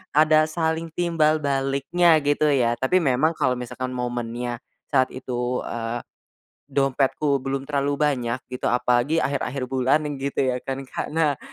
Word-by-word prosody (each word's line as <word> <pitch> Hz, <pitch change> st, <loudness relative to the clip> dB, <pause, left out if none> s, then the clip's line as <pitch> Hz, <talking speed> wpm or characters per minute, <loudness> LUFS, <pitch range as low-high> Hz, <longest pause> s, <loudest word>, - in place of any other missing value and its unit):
ada 155 Hz, 0 st, +5 dB
saling 160 Hz, +1 st, -1 dB
timbal 160 Hz, -3 st, +2 dB
baliknya 140 Hz, +5 st, +2 dB
gitu 145 Hz, +1 st, +2 dB
ya 120 Hz, -3 st, +2 dB
tapi 180 Hz, +8 st, +2 dB
memang 140 Hz, +5 st, +2 dB
kalo 130 Hz, -4 st, +1 dB
misalkan 125 Hz, +1 st, -5 dB
momennya, 120 Hz, -1 st, -3 dB, 0.3 s
saat 130 Hz, -3 st, +2 dB
itu, 125 Hz, -1 st, -3 dB
eee, 115 Hz, 0 st, -3 dB, 0.7 s
dompetku 140 Hz, +1 st, +1 dB
belum 135 Hz, +1 st, -3 dB
terlalu 140 Hz, 0 st, -1 dB
banyak 130 Hz, -5 st, 0 dB
gitu 125 Hz, -, -2 dB
apalagi 125 Hz, +6 st, +2 dB
akhir-akhir 135 Hz, -1 st, -2 dB
bulan 130 Hz, +4 st, +2 dB
nih 150 Hz, -, -3 dB, 0.2 s
gitu -, -, -4 dB
ya 125 Hz, -, -1 dB
kan 135 Hz, +1 st, -5 dB
Kak, 130 Hz, -, -5 dB
nah 150 Hz, -4 st, +2 dB
135 Hz, 145 wpm, -24 LUFS, 125-150 Hz, 0.7 s, ada